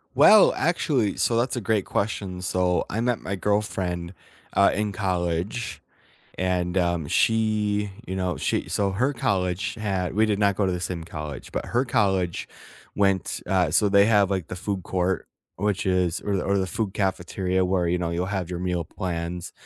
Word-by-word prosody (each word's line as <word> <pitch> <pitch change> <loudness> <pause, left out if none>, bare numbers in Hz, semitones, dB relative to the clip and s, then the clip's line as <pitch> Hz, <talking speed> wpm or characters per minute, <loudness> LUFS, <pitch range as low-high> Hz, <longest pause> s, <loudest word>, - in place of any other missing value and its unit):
Well, 215 -2 +7
actually, 145 - +1
so 115 - +2
that's 125 +4 0
a 120 - -2
great 105 -1 0
question. 100 -3 -2
So, 90 -1 +1
I 110 - -2
met 120 0 0
my 100 - -3
girlfriend, 95 -3 -1 0.4
uh, 100 - +5
in 105 0 -1
college 90 +3 -2 0.6
and, 90 0 0
um, 85 -3 0
she, 105 -1 +1 0.2
you 95 - -4
know, 90 -5 -1
she - - -1
so 100 -1 0
her 125 +9 +1
college 100 -3 -1
had 95 -5 -2
we 110 +2 +4
did 105 -2 +1
not 100 -2 +2
go 100 - +1
to 95 - +1
the 90 - -3
same 85 -2 -4
college, 75 -4 -7
but - - -3
her 120 +3 +1
college 95 -8 0 0.5
went, 95 -2 +1
uh, 90 -3 +2
so 100 +5 +3
they 100 0 +6
have 105 -3 +4
like 95 -4 -1
the - - -5
food 95 +1 -3
court, 90 +1 -1 0.3
which 100 +1 -1
is 90 -3 +1
or 100 -1 0
the 95 - -1
or 100 - +1
the 95 - 0
food 95 +3 -3
cafeteria 95 -1 0
where, 90 -1 +1
you 90 +1 +1
know, 85 -1 -1
you'll 85 +1 -1
have 95 -3 -3
your 90 -1 -4
meal 90 -1 -1
plans 85 -1 -4
95 Hz, 185 wpm, -25 LUFS, 90-105 Hz, 0.6 s, Well